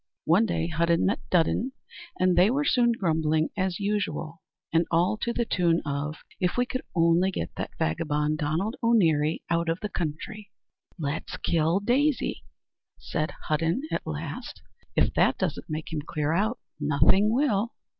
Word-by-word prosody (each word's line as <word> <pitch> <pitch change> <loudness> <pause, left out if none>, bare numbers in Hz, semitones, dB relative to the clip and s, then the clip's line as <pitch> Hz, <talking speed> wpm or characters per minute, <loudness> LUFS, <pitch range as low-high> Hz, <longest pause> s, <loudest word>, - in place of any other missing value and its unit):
One 190 +8 +4
day 165 - -1
Hudden 170 0 +1
met 195 - +1
Dudden, 185 +9 +2 0.5
and 185 -1 +3
they 180 +4 +5
were 285 +4 +1
soon 240 -3 +4
grumbling 160 -6 +1
as 185 -1 -1
usual, 190 -6 -2 0.3
and 165 +1 +3
all 175 +5 +2
to 235 - -2
the 235 0 -1
tune 170 -5 +2
of 145 +2 -3 0.2
"If 180 +3 0 0.4
only 170 +2 +4
we - - 0
could - - -22
get 85 - -3
that - - -3
vagabond 150 - 0
Donald 165 +10 -1
O'Neary 165 -10 +3
out 170 0 +1
of 165 +2 0
the 210 - -3
country." 185 +6 -5 0.5
"Let's 150 -1 -4
kill 165 +2 +1
Daisy," 270 +6 +1 0.6
said 155 - -2
Hudden 165 - 0
at - - -3
last; - - -6 0.3
"if - - +2
that - - +3
doesn't - - -3
make 155 +1 -5
him 155 - -1
clear 155 0 -2
out, 215 +7 +1 0.2
nothing 150 +8 +3
will." 235 -4 +1
170 Hz, 155 wpm, -27 LUFS, 155-210 Hz, 0.6 s, they